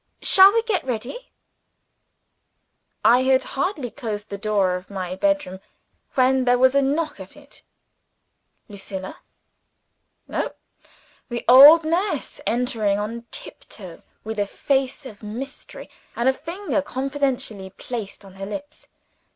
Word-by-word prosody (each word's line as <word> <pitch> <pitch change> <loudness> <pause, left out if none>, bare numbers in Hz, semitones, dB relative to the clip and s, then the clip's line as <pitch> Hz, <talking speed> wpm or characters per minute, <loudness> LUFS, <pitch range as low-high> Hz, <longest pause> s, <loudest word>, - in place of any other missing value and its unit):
Shall 385 +1 +8
we 455 +1 +1
get 435 -5 -1
ready?" 255 - -5 1.8
I 245 +2 +6
had 260 0 +3
hardly 285 - -3
closed 215 -6 -6
the 200 - -4
door 200 -3 +1
of 180 +1 -6
my 185 -2 -5
bedroom 290 -7 -1 0.6
when 260 0 +3
there 245 0 +4
was 260 +1 +4
a 280 - +4
knock 300 +4 -1
at - - -11
it. - - -14 1.1
Lucilla? 195 -2 -8 1.1
No; - - -3 0.8
the 240 -1 -5
old 285 +7 +9
nurse 350 +6 -1
entering 225 -4 0
on 230 +3 -5
tiptoe, - - -9 0.2
with 220 0 -5
a 205 - 0
face 270 +4 -1
of 215 -6 -11
mystery, 230 +6 -8 0.3
and 235 - 0
a 265 - +5
finger 340 +2 -3
confidentially 265 -8 -3
placed 205 0 -7
on 190 - -14
her 195 - -6
lips. 290 +8 -8
250 Hz, 125 wpm, -22 LUFS, 210-285 Hz, 1.8 s, old